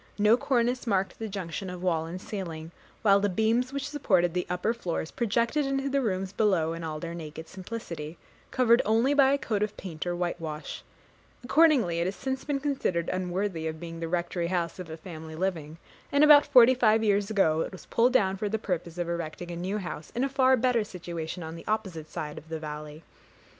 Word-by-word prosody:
No 210 Hz, +2 st, +5 dB
cornice 245 Hz, -1 st, 0 dB
marked 195 Hz, -3 st, 0 dB
the 225 Hz, -, -3 dB
junction 190 Hz, -1 st, -5 dB
of 180 Hz, 0 st, -7 dB
wall 165 Hz, -3 st, +1 dB
and 175 Hz, +3 st, -6 dB
ceiling; 170 Hz, -6 st, -6 dB, 0.3 s
while 200 Hz, -2 st, +6 dB
the 205 Hz, 0 st, +1 dB
beams 225 Hz, +6 st, +1 dB
which 280 Hz, 0 st, -3 dB
supported 190 Hz, -, +2 dB
the 180 Hz, 0 st, -1 dB
upper 180 Hz, +6 st, 0 dB
floors 175 Hz, -8 st, -3 dB
projected 235 Hz, +6 st, +1 dB
into 275 Hz, 0 st, -1 dB
the 275 Hz, 0 st, +1 dB
rooms 190 Hz, -4 st, -2 dB
below 185 Hz, -7 st, +2 dB
in 165 Hz, 0 st, -6 dB
all 155 Hz, -1 st, -4 dB
their 170 Hz, +1 st, -5 dB
naked 160 Hz, -1 st, -8 dB
simplicity, 175 Hz, -6 st, -7 dB, 0.3 s
covered 240 Hz, -1 st, +4 dB
only 230 Hz, +6 st, +3 dB
by 275 Hz, -2 st, +5 dB
a 280 Hz, -, +3 dB
coat 215 Hz, -7 st, -2 dB
of 210 Hz, 0 st, -2 dB
paint 175 Hz, -2 st, -6 dB
or 175 Hz, -, -1 dB
whitewash: 165 Hz, -3 st, -4 dB, 0.6 s
accordingly 255 Hz, -, +4 dB
it 170 Hz, -, +1 dB
has 190 Hz, -, -3 dB
since 265 Hz, 0 st, -3 dB
been 285 Hz, -2 st, -1 dB
considered 260 Hz, -, -1 dB
unworthy 185 Hz, -2 st, -2 dB
of 160 Hz, 0 st, -5 dB
being 165 Hz, 0 st, -7 dB
the 165 Hz, -, -3 dB
Rectory 170 Hz, 0 st, -1 dB
house 175 Hz, -1 st, -2 dB
of 180 Hz, -3 st, -7 dB
a 160 Hz, -, -6 dB
family 160 Hz, -2 st, -9 dB
living, 165 Hz, -3 st, -3 dB, 0.3 s
and 285 Hz, +1 st, +4 dB
about 295 Hz, 0 st, +8 dB
forty 255 Hz, -3 st, +7 dB
five 225 Hz, -3 st, +3 dB
years 205 Hz, -1 st, +2 dB
ago 160 Hz, -7 st, +2 dB
it -, -, -3 dB
was 185 Hz, -, -11 dB
pulled 240 Hz, +2 st, +3 dB
down 195 Hz, -6 st, +3 dB
for 205 Hz, +1 st, -2 dB
the 220 Hz, -, 0 dB
purpose 180 Hz, -4 st, -4 dB
of 175 Hz, -1 st, -2 dB
erecting 170 Hz, 0 st, -4 dB
a -, -, -4 dB
new 185 Hz, +4 st, -2 dB
house 170 Hz, -5 st, -6 dB
in 245 Hz, -, +1 dB
a 275 Hz, -, +1 dB
far 260 Hz, -1 st, +4 dB
better 245 Hz, -2 st, +2 dB
situation 175 Hz, -3 st, -6 dB
on 160 Hz, 0 st, -6 dB
the 165 Hz, -, -11 dB
opposite 190 Hz, -8 st, -2 dB
side 150 Hz, -1 st, -5 dB
of 160 Hz, -, -19 dB
the 160 Hz, -, -3 dB
valley. 150 Hz, 0 st, -7 dB
185 Hz, 210 wpm, -28 LUFS, 165-230 Hz, 0.6 s, about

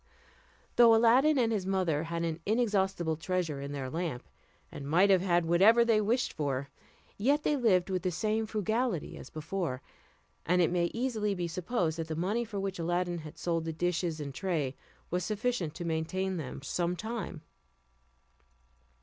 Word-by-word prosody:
Though 235 Hz, -1 st, +8 dB
Aladdin 250 Hz, +7 st, +5 dB
and 235 Hz, -3 st, +2 dB
his 200 Hz, -4 st, -1 dB
mother 175 Hz, -5 st, 0 dB
had 170 Hz, 0 st, -3 dB
an 165 Hz, -1 st, -2 dB
inexhaustible 195 Hz, -7 st, +1 dB
treasure 165 Hz, -4 st, -2 dB
in 140 Hz, 0 st, -5 dB
their 140 Hz, -2 st, -4 dB
lamp, 160 Hz, -3 st, -4 dB, 0.4 s
and 140 Hz, 0 st, -7 dB
might 185 Hz, +6 st, +5 dB
have 185 Hz, -2 st, +5 dB
had 175 Hz, -2 st, +2 dB
whatever 205 Hz, +8 st, +5 dB
they 225 Hz, -2 st, +3 dB
wished 235 Hz, +4 st, 0 dB
for, 140 Hz, -2 st, -2 dB, 0.5 s
yet 285 Hz, +8 st, +2 dB
they 300 Hz, -, +2 dB
lived 195 Hz, -9 st, +2 dB
with 185 Hz, -1 st, 0 dB
the 185 Hz, -, 0 dB
same 215 Hz, +5 st, -1 dB
frugality 220 Hz, -, -1 dB
as -, -, -10 dB
before, 155 Hz, -4 st, -4 dB, 0.6 s
and 180 Hz, +2 st, +2 dB
it 170 Hz, -2 st, +3 dB
may 175 Hz, -1 st, +2 dB
easily 220 Hz, -1 st, -1 dB
be 175 Hz, -2 st, -2 dB
supposed 170 Hz, -1 st, -1 dB
that 160 Hz, -, -3 dB
the 160 Hz, -, -3 dB
money 200 Hz, +8 st, 0 dB
for 215 Hz, -3 st, -5 dB
which 195 Hz, -2 st, -3 dB
Aladdin 175 Hz, +1 st, -1 dB
had 155 Hz, +1 st, -10 dB
sold 165 Hz, -2 st, -1 dB
the 160 Hz, 0 st, -3 dB
dishes 170 Hz, -1 st, -1 dB
and 140 Hz, -2 st, -5 dB
tray 145 Hz, -4 st, -2 dB, 0.4 s
was 180 Hz, +1 st, 0 dB
sufficient 210 Hz, -4 st, -1 dB
to 175 Hz, -, -5 dB
maintain 180 Hz, +4 st, -1 dB
them 135 Hz, -3 st, -6 dB
some 175 Hz, +4 st, -1 dB
time. 210 Hz, -6 st, -5 dB
180 Hz, 170 wpm, -30 LUFS, 165-215 Hz, 0.6 s, Though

